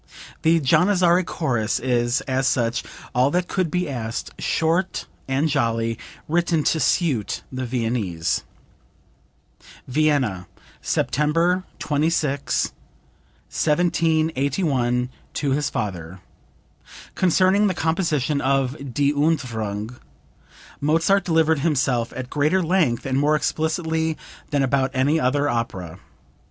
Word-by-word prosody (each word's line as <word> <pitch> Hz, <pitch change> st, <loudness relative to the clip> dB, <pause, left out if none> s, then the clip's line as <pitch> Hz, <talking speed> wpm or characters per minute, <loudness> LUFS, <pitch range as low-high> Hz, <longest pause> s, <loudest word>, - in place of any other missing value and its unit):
The 165 Hz, +1 st, +4 dB
Janizary 180 Hz, +4 st, +3 dB
chorus 120 Hz, -11 st, -1 dB
is, 120 Hz, -1 st, +1 dB
as 130 Hz, 0 st, 0 dB
such, 120 Hz, -2 st, 0 dB, 0.3 s
all 130 Hz, +1 st, +3 dB
that 180 Hz, +3 st, 0 dB
could 185 Hz, -3 st, -1 dB
be 180 Hz, +2 st, -1 dB
asked, 120 Hz, -4 st, -4 dB
short 170 Hz, +3 st, 0 dB, 0.2 s
and 135 Hz, +4 st, +1 dB
jolly, 115 Hz, -5 st, 0 dB, 0.3 s
written 170 Hz, -1 st, +1 dB
to 160 Hz, -, +1 dB
suit 145 Hz, -, 0 dB
the 130 Hz, -1 st, -4 dB
Viennese." 115 Hz, -9 st, -1 dB, 1.4 s
(Vienna, 130 Hz, -, +1 dB, 0.3 s
September 165 Hz, +6 st, +1 dB
26, 150 Hz, -2 st, 0 dB, 0.8 s
1781, 150 Hz, -6 st, +1 dB, 0.3 s
to 140 Hz, -2 st, 0 dB
his 145 Hz, +1 st, 0 dB
father. 90 Hz, -, -4 dB, 0.9 s
Concerning 185 Hz, +3 st, +3 dB
the 185 Hz, -, -1 dB
composition 155 Hz, -4 st, 0 dB
of 135 Hz, -1 st, -1 dB
"Die 145 Hz, 0 st, +3 dB
Entfuhrung," 120 Hz, -7 st, -1 dB, 0.8 s
Mozart 165 Hz, +6 st, +2 dB
delivered 160 Hz, -3 st, +2 dB
himself 135 Hz, -6 st, +1 dB
at 130 Hz, 0 st, -6 dB
greater 155 Hz, +6 st, +2 dB
length 160 Hz, -9 st, +1 dB
and 135 Hz, 0 st, 0 dB
more 150 Hz, +2 st, +3 dB
explicitly 160 Hz, +1 st, -1 dB, 0.3 s
than 145 Hz, -2 st, +1 dB
about 135 Hz, 0 st, +1 dB
any 140 Hz, +5 st, +2 dB
other 145 Hz, +1 st, +1 dB
opera. 100 Hz, -, -3 dB
145 Hz, 105 wpm, -22 LUFS, 125-160 Hz, 1.4 s, The